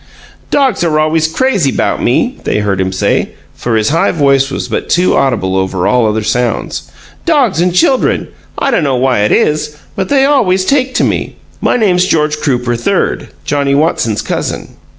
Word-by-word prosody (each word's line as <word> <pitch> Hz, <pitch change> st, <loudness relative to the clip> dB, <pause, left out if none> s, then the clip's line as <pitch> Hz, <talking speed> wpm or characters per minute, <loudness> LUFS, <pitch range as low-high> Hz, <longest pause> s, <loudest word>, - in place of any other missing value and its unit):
"Dogs 270 Hz, -9 st, +1 dB
are 160 Hz, -3 st, +1 dB
always 155 Hz, +1 st, +1 dB
crazy 190 Hz, -, +1 dB
'bout -, -, -1 dB
me," -, -, 0 dB
they -, -, -1 dB
heard 100 Hz, -2 st, 0 dB
him 95 Hz, 0 st, -1 dB
say, 95 Hz, -, -1 dB, 0.2 s
for 120 Hz, -2 st, -2 dB
his 110 Hz, -1 st, +1 dB
high 165 Hz, +3 st, +2 dB
voice 140 Hz, -4 st, +2 dB
was -, -, -4 dB
but -, -, -3 dB
too 180 Hz, +1 st, +2 dB
audible 110 Hz, -9 st, 0 dB
over 95 Hz, -1 st, -1 dB
all 125 Hz, -3 st, +2 dB
other 110 Hz, 0 st, -1 dB
sounds. 120 Hz, +2 st, -2 dB, 0.3 s
"Dogs 265 Hz, -, +2 dB
and 180 Hz, +1 st, +2 dB
chuldren. 250 Hz, +9 st, +1 dB, 0.3 s
I 275 Hz, -, 0 dB
dunno 140 Hz, -, +1 dB
why 125 Hz, -2 st, +1 dB
it 105 Hz, -, +1 dB
is, 150 Hz, 0 st, 0 dB, 0.2 s
but 190 Hz, -, -3 dB
they 270 Hz, -1 st, +3 dB
always 190 Hz, -10 st, +2 dB
take 260 Hz, 0 st, +1 dB
to -, -, +2 dB
me. -, -, -1 dB, 0.3 s
My -, -, +2 dB
name's 185 Hz, -6 st, +2 dB
George 155 Hz, -3 st, +1 dB
Crooper, 125 Hz, -4 st, -1 dB
Third, 120 Hz, -, -1 dB, 0.2 s
Johnnie 140 Hz, -1 st, 0 dB
Watson's 140 Hz, -8 st, 0 dB
cousin. -, -, -3 dB
150 Hz, 175 wpm, -12 LUFS, 120-185 Hz, 0.3 s, they